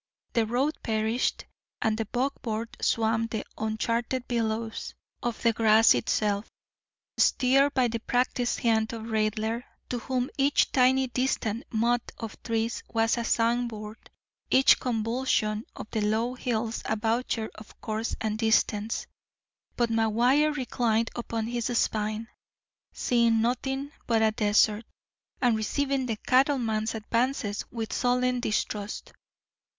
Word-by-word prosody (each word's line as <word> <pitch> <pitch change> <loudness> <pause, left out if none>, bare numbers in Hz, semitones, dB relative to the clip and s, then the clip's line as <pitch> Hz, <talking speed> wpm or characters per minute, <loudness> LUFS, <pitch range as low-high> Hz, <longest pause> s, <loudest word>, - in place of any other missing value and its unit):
The 225 -2 +2
road 265 +7 0
perished, 220 +2 0 0.3
and 220 -1 +1
the 225 0 -2
buckboard 235 -2 -3
swam 225 0 +1
the 220 -2 -4
uncharted 230 +3 -2
billows 225 -1 -2 0.3
of 240 -2 -2
the 230 -1 +4
grass 220 0 +6
itself, 210 -1 0 0.7
steered 275 +2 +4
by 255 -2 +3
the 230 0 -3
practised 245 +1 0
hand 220 -1 +2
of 225 -1 -6
Raidler, 220 +2 0 0.3
to 245 - -2
whom 255 +1 -2
each 275 +1 +3
tiny 260 +1 +4
distant 245 -3 -1
mott 235 +2 0
of 225 -2 -8
trees 230 0 -1
was 225 0 +2
a 235 - -2
signboard, 230 -2 -1 0.4
each 265 +1 +6
convolution 225 -2 0
of - - -7
the 220 - -1
low 220 +4 0
hills 235 -2 -2
a 220 - 0
voucher 225 0 -1
of 215 - -14
course 220 +1 -3
and 220 0 -2
distance. 220 -1 +1 0.7
But 235 -1 +1
McGuire 240 +7 +3
reclined 230 -4 0
upon 230 -2 -3
his 235 0 -2
spine, 215 +1 -1 0.6
seeing 235 -2 +2
nothing 265 +4 -1 0.2
but 225 -2 +3
a 220 - +4
desert, 210 +1 +2 0.6
and 240 -2 +4
receiving 270 +4 -1
the 225 - -1
cattleman's 235 -4 +1
advances 225 -1 -1
with 225 -2 -4
sullen 250 0 +1
distrust. 210 -2 -3
230 Hz, 125 wpm, -27 LUFS, 220-245 Hz, 0.7 s, grass